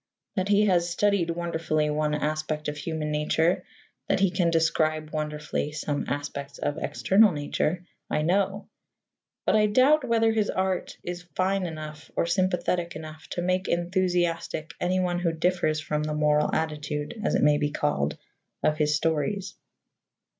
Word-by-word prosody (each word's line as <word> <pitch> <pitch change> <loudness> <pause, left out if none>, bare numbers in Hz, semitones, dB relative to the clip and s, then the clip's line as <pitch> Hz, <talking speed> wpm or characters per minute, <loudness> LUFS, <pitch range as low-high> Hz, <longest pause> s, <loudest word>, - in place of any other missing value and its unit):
That 190 -2 0
he 205 +1 +5
has 175 -3 +2
studied 195 -1 +1
wonderfully 165 -3 0
one 150 0 0
aspect 155 0 -2
of 150 - -2
human 150 0 -3
nature, 160 +4 +1 0.4
that - - +2
he 195 -1 +3
can 175 -1 +2
describe 155 -1 +1
wonderfully 150 -1 -2
some 150 -1 -2
aspects 140 -1 -4
of 145 +2 -2
external 205 +5 +4
nature, 155 +3 -1 0.2
I 150 - 0
know; 195 +4 +1 0.8
but - - +3
I 210 0 +5
doubt 265 +8 +4
whether 225 -2 +3
his 215 -2 +1
art 190 -1 -1
is 175 0 -6
fine 190 0 +1
enough 155 -1 -8
or - - +2
sympathetic 180 -1 0
enough 155 0 -9
to 175 - -2
make 185 +1 0
enthusiastic 175 -2 0
anyone 180 -1 +1
who 175 -2 +1
differs 165 -2 +1
from 150 0 -2
the 150 0 -2
moral 150 0 +3
attitude, 150 +5 -3
as - - +1
it - - +2
may 150 0 +5
be 145 -1 +1
called, 145 - -1 0.5
of 155 +1 +2
his 150 0 +3
stories. 165 +5 -1
165 Hz, 155 wpm, -26 LUFS, 150-185 Hz, 0.8 s, he